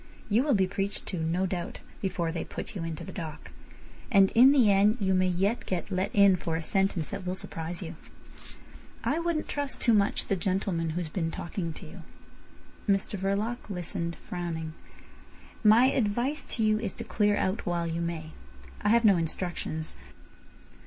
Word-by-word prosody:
"You 220 Hz, +3 st, +4 dB
will 280 Hz, -2 st, +2 dB
be 190 Hz, -2 st, +4 dB
preached 195 Hz, +1 st, -3 dB
to, 185 Hz, -, -3 dB
no 165 Hz, +4 st, 0 dB
doubt, 175 Hz, -2 st, -4 dB, 0.2 s
before 180 Hz, -4 st, -1 dB
they 165 Hz, -, -3 dB
put -, -, -7 dB
you 180 Hz, -, -3 dB
into 165 Hz, -2 st, -4 dB
the -, -, -7 dB
dock. 160 Hz, -4 st, -7 dB, 0.6 s
And 195 Hz, -3 st, +6 dB
in 255 Hz, +4 st, +8 dB
the 250 Hz, -8 st, +5 dB
end 205 Hz, +3 st, +4 dB
you 190 Hz, -2 st, +2 dB
may 185 Hz, 0 st, +3 dB
yet 195 Hz, +6 st, 0 dB
get 185 Hz, +2 st, -2 dB
let 185 Hz, +1 st, 0 dB
in 200 Hz, -2 st, +6 dB
for 165 Hz, -1 st, -2 dB
a 165 Hz, -, -1 dB
sentence 190 Hz, -2 st, 0 dB
that 200 Hz, -, -5 dB
will 180 Hz, 0 st, -2 dB
surprise 170 Hz, 0 st, -5 dB
you. 165 Hz, 0 st, -7 dB, 1.1 s
I -, -, +1 dB
wouldn't 335 Hz, -2 st, -1 dB
trust 285 Hz, -2 st, -3 dB
too 235 Hz, -, +3 dB
much 200 Hz, -2 st, +2 dB
the 195 Hz, -, +1 dB
gentleman 185 Hz, -2 st, -1 dB
who's 175 Hz, -3 st, -2 dB
been 165 Hz, 0 st, -1 dB
talking 170 Hz, +1 st, -4 dB
to -, -, -10 dB
you." -, -, -10 dB, 0.9 s
Mr 195 Hz, +1 st, +2 dB
Verloc 205 Hz, +5 st, -2 dB
listened, 175 Hz, -2 st, -3 dB
frowning. 165 Hz, -3 st, -4 dB, 0.9 s
"My 230 Hz, +5 st, +7 dB
advice 245 Hz, +6 st, 0 dB
to 225 Hz, -, 0 dB
you 215 Hz, 0 st, +3 dB
is 215 Hz, -4 st, -4 dB
to -, -, -6 dB
clear 205 Hz, -1 st, +2 dB
out 190 Hz, +4 st, -1 dB
while 175 Hz, -1 st, 0 dB
you 165 Hz, +1 st, -2 dB
may. 165 Hz, -2 st, -4 dB, 0.5 s
I -, -, +1 dB
have 235 Hz, +1 st, +4 dB
no 200 Hz, -4 st, +7 dB
instructions. 165 Hz, -1 st, -3 dB
190 Hz, 180 wpm, -28 LUFS, 170-210 Hz, 1.1 s, in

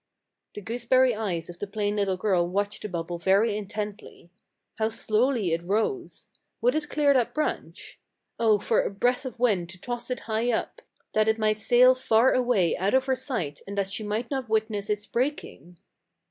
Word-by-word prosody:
The 210 Hz, -, -6 dB
gooseberry 245 Hz, +3 st, +2 dB
eyes 190 Hz, -7 st, -3 dB
of 175 Hz, 0 st, -11 dB
the 205 Hz, -, -4 dB
plain 205 Hz, +1 st, -2 dB
little 195 Hz, -2 st, 0 dB
girl 180 Hz, -3 st, +1 dB
watched 200 Hz, +3 st, -2 dB
the 210 Hz, -, -5 dB
bubble 170 Hz, -1 st, -4 dB
very 200 Hz, +4 st, +3 dB
intently. 205 Hz, -3 st, -6 dB, 0.5 s
How 220 Hz, 0 st, +2 dB
slowly 225 Hz, -3 st, 0 dB
it 165 Hz, -, -1 dB
rose! 220 Hz, -, -2 dB, 0.3 s
Would 245 Hz, +2 st, +2 dB
it 310 Hz, -1 st, -2 dB
clear 290 Hz, -2 st, +3 dB
that 250 Hz, -4 st, +1 dB
branch? 305 Hz, -, -4 dB, 0.4 s
Oh, 220 Hz, -2 st, +4 dB
for 220 Hz, +3 st, +1 dB
a -, -, -2 dB
breath 245 Hz, +6 st, 0 dB
of 255 Hz, -, -6 dB
wind 205 Hz, -8 st, +1 dB
to 185 Hz, +1 st, -11 dB
toss 240 Hz, +5 st, -5 dB
it 250 Hz, -, -3 dB
high 225 Hz, +2 st, -1 dB
up, 240 Hz, -, -3 dB, 0.3 s
that 215 Hz, 0 st, +2 dB
it 220 Hz, 0 st, +2 dB
might 215 Hz, -1 st, +1 dB
sail 250 Hz, +3 st, +6 dB
far 250 Hz, -1 st, +3 dB
away 240 Hz, -9 st, +2 dB
out 195 Hz, +6 st, +1 dB
of 265 Hz, 0 st, +3 dB
her 265 Hz, -1 st, +1 dB
sight 175 Hz, -, -4 dB
and 200 Hz, +1 st, -6 dB
that 195 Hz, -1 st, -1 dB
she 210 Hz, -, -3 dB
might 215 Hz, +4 st, -3 dB
not 265 Hz, -4 st, -3 dB
witness 215 Hz, -2 st, -1 dB
its 210 Hz, 0 st, -1 dB
breaking! 235 Hz, -, -3 dB
215 Hz, 190 wpm, -26 LUFS, 195-245 Hz, 0.5 s, sail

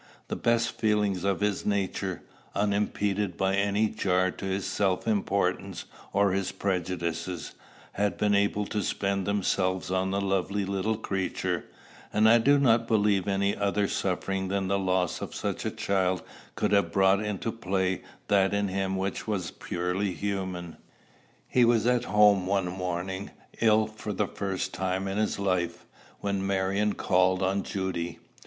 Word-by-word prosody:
The -, -, -1 dB
best 115 Hz, 0 st, +2 dB
feelings 105 Hz, -4 st, +1 dB
of 100 Hz, 0 st, 0 dB
his 105 Hz, -1 st, 0 dB
nature, 100 Hz, -2 st, -1 dB, 0.3 s
unimpeded 100 Hz, -2 st, 0 dB
by 95 Hz, 0 st, +1 dB
any 100 Hz, +2 st, +2 dB
jar 95 Hz, -2 st, +1 dB
to 95 Hz, -, -8 dB
his 95 Hz, 0 st, -1 dB
self 95 Hz, +1 st, 0 dB
importance 100 Hz, -2 st, 0 dB, 0.3 s
or 100 Hz, 0 st, +3 dB
his 95 Hz, 0 st, -1 dB
prejudices, 90 Hz, -2 st, -3 dB, 0.4 s
had 100 Hz, 0 st, -1 dB
been 105 Hz, -1 st, +2 dB
able 100 Hz, +1 st, +2 dB
to 105 Hz, +1 st, -2 dB
spend 100 Hz, -1 st, -1 dB
themselves 95 Hz, -2 st, 0 dB
on 95 Hz, 0 st, +1 dB
the 100 Hz, +1 st, 0 dB
lovely 100 Hz, +1 st, 0 dB
little 100 Hz, +3 st, -1 dB
creature; 95 Hz, -4 st, -2 dB, 0.5 s
and 110 Hz, +1 st, +4 dB
I 115 Hz, +1 st, +7 dB
do 140 Hz, +5 st, +5 dB
not 115 Hz, -4 st, +3 dB
believe 105 Hz, -4 st, +2 dB
any 100 Hz, 0 st, +1 dB
other 100 Hz, 0 st, +1 dB
suffering 95 Hz, 0 st, -1 dB
than 95 Hz, 0 st, -1 dB
the 100 Hz, 0 st, +2 dB
loss 90 Hz, -2 st, 0 dB
of -, -, -6 dB
such -, -, -3 dB
a -, -, +1 dB
child 95 Hz, -2 st, 0 dB, 0.3 s
could -, -, 0 dB
have 100 Hz, -5 st, +3 dB
brought 95 Hz, +2 st, +4 dB
into 105 Hz, +1 st, -2 dB
play 95 Hz, -4 st, -1 dB, 0.3 s
that 100 Hz, 0 st, +3 dB
in 100 Hz, -1 st, 0 dB
him 95 Hz, 0 st, -1 dB
which 95 Hz, +3 st, -3 dB
was 95 Hz, -5 st, -2 dB
purely 90 Hz, +2 st, -2 dB
human. 95 Hz, -4 st, -4 dB, 0.7 s
He 125 Hz, -, +3 dB
was 115 Hz, -1 st, +4 dB
at 125 Hz, 0 st, +2 dB
home 100 Hz, -2 st, +4 dB
one 95 Hz, -2 st, +1 dB
morning, 90 Hz, +1 st, -3 dB, 0.3 s
ill 110 Hz, -1 st, +4 dB
for 110 Hz, -1 st, -6 dB
the 105 Hz, +2 st, +1 dB
first 95 Hz, -1 st, -3 dB
time 95 Hz, +1 st, -1 dB
in 95 Hz, +2 st, -2 dB
his 110 Hz, -, 0 dB
life, 90 Hz, -4 st, -1 dB, 0.4 s
when 100 Hz, -1 st, -1 dB
Marion 100 Hz, +2 st, +1 dB
called 95 Hz, +1 st, +2 dB
on 95 Hz, +1 st, +1 dB
Judy. 95 Hz, -3 st, -3 dB
100 Hz, 155 wpm, -28 LUFS, 95-105 Hz, 0.7 s, I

